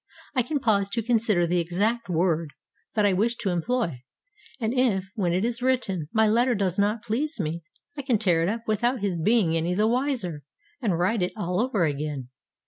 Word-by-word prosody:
I 255 - +3
can 285 +5 -2
pause 200 -5 +2
to 230 +2 -2
consider 220 -6 +2
the 175 +1 +1
exact 205 +7 -1
word 165 -3 0 0.4
that 210 -2 +3
I 200 - +4
wish 225 +6 +1
to 195 -4 -2
employ. 175 - -1 0.6
And 225 -1 -1
if, 245 -7 +2
when 190 -6 0
it 185 +5 +1
is 240 0 -2
written, 245 - 0
my 220 0 +3
letter 240 +3 +3
does 195 -2 0
not 210 +2 +1
please 255 +6 -2
me, 165 -1 -2 0.3
I 285 - -4
can 255 -4 +1
tear 180 -6 +2
it 170 - +1
up 225 +2 -3
without 235 +3 0
his 185 -5 -1
being 200 -3 +3
any 165 +2 0
the 210 +3 +3
wiser, 240 - -1 0.4
and 200 -9 +1
write 185 +5 +1
it 180 - -1
all 180 -2 -1
over 220 -7 +1
again. 145 -3 -3
205 Hz, 200 wpm, -26 LUFS, 175-235 Hz, 0.6 s, I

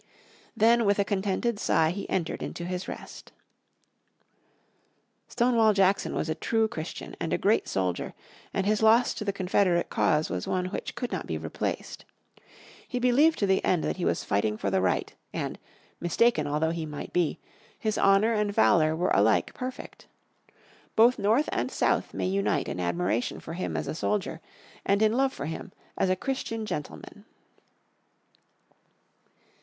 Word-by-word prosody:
Then 235 +2 +5
with 200 0 +3
a 200 - +2
contented 205 +3 -1
sight 160 -4 +2
he 200 - -6
entered 170 -4 -2
into 170 - -5
his 180 +1 -4
rest. - - -9 2.0
Stonewall 235 -3 +3
Jackson 195 0 +2
was - - -1
a 160 - 0
true 220 +7 +1
Christian 160 -5 -7
and - - -3
a - - +2
great - - +2
soldier, 95 -2 -2 0.4
and 195 - -1
his 210 +1 +1
loss 225 +3 +5
to - - -5
the 200 - 0
Confederate 185 -2 +1
cause 155 0 +2
was 90 -1 -3
one 180 -1 0
which - - -5
could 245 - -4
not - - -4
be - - -2
replaced. - - -4 0.8
He 250 - -3
believed 255 +6 +4
to 205 - +1
the 190 -1 +2
end 180 -3 +2
that - - -2
he 180 - -3
was - - 0
fighting 105 +1 0
for 100 - -2
the 95 -1 +2
right, 95 - 0 0.2
and, - - -4 0.4
mistaken 175 -2 +2
although 150 +2 0
he 165 -1 -4
might 150 -1 -7
be, 175 -3 +1 0.4
his 215 -1 -1
honour 195 +4 +4
and 210 -1 0
valour 155 - +4
were 175 +3 0
alike 105 +2 +3
perfect. 255 0 -7 0.9
Both 235 +3 +5
North 225 +9 +2
and - - -1
South - - 0
may - - -3
unite 190 -5 0
in - - -4
admiration 90 +6 -1
for 165 - -8
him 185 - -3
as - - -2
a - - -2
soldier, 165 -1 -2 0.4
and 200 +2 +2
in 215 0 +3
love 265 +2 +2
for 145 - -6
him 165 +4 -6 0.2
as 190 - +1
a 185 - +3
Christian 225 -1 -3
gentleman. 205 +4 -7
190 Hz, 165 wpm, -27 LUFS, 160-220 Hz, 2.0 s, Then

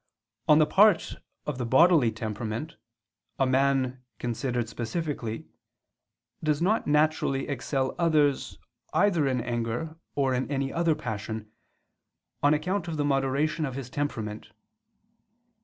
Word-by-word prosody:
On 150 - +7
the 155 - +6
part 200 +7 +4 0.3
of 145 -4 -4
the 125 - -1
bodily 145 -2 +5
temperament, 110 +7 -4 0.6
a 135 - +3
man, 130 -1 +1 0.2
considered 120 0 -2
specifically, 120 0 -4 1.0
does 150 -1 +1
not 205 +6 +1
naturally 150 -2 +2
excel 135 -1 -1
others 150 -5 +2 0.4
either 175 -8 +3
in 130 -2 0
anger 120 +7 -3 0.2
or 135 -2 +1
in 130 +2 -1
any 135 -1 -1
other 165 -2 +2
passion, 110 -1 -5 0.9
on 145 +1 +4
account 180 +3 -2
of 165 -2 -3
the 145 - 0
moderation 140 +3 +1
of 135 -4 -3
his 130 -3 -6
temperament. 110 -8 -4
135 Hz, 125 wpm, -27 LUFS, 120-155 Hz, 1.0 s, On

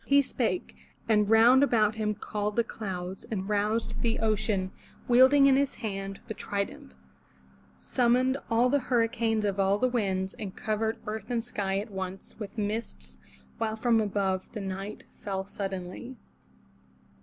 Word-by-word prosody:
He 280 0 +5
spake, 260 +6 -2 0.3
and 210 -2 +3
round 235 +4 +7
about 220 -6 +3
him 215 -1 -1
called 210 0 -3
the 235 - +3
clouds. 190 -4 -5
And 195 -3 -4
roused 210 +2 0
the 230 -1 +1
ocean, 210 -3 0 0.2
— - - -26
wielding 260 +3 +7
in 275 -1 +6
his 280 0 +1
hand 195 -3 -5
The 220 - -4
trident, 200 - -4 0.5
— 65 0 -30
summoned 250 - +2
all 230 +2 +4
the 285 - +4
hurricanes 230 -3 +1
Of 200 -1 -1
all 195 +1 +3
the 255 - +2
winds, 195 -6 -1
and 195 -4 -6
covered 220 +1 -1
earth 215 0 -5
and 235 -2 0
sky 195 -5 -2
At 210 +2 -4
once 190 0 -6
with 210 +1 -7
mists, 215 +2 -4 0.4
while 220 -1 -1
from 230 0 +3
above, 195 -2 -1
the 215 - -4
night 195 +2 -5 0.2
Fell 190 -1 -2
suddenly. 195 +5 -6
215 Hz, 155 wpm, -28 LUFS, 195-235 Hz, 0.5 s, round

